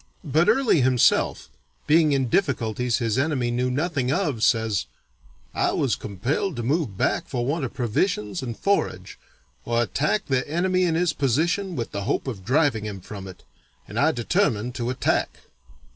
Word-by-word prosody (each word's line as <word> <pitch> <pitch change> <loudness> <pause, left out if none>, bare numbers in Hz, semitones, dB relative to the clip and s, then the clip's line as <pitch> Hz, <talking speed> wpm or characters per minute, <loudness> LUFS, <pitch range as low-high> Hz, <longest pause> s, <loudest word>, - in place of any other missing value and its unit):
But 155 +2 +2
Early 265 - +3
himself, 125 -2 +2 0.3
being 155 0 +4
in 135 -2 +1
difficulties 125 - 0
his 115 -1 0
enemy 130 -4 0
knew 125 +1 0
nothing 140 -1 -1
of, 140 - -1
says, 110 -3 +1 0.7
"I - - +1
was - - +1
compelled 120 - -2
to 120 - -4
move 135 - -1
back - - 0
for 120 -2 -2
want 145 +2 -1
of 120 - -7
provisions 115 - -1
and 120 -3 -5
forage, 200 0 -1 0.4
or 120 0 0
attack 150 - 0
the 130 -1 -1
enemy 185 +3 +1
in 165 -2 +1
his 170 -1 +1
position 165 - 0
with 115 -4 -4
the 100 -1 -4
hope - - -1
of 110 -8 -5
driving 130 - +2
him 100 -2 -5
from 95 +1 -9
it, 95 - -12 0.4
and - - -4
I - - +4
determined 120 - 0
to 120 -1 -3
attack." 130 - -1
130 Hz, 165 wpm, -24 LUFS, 115-160 Hz, 0.7 s, being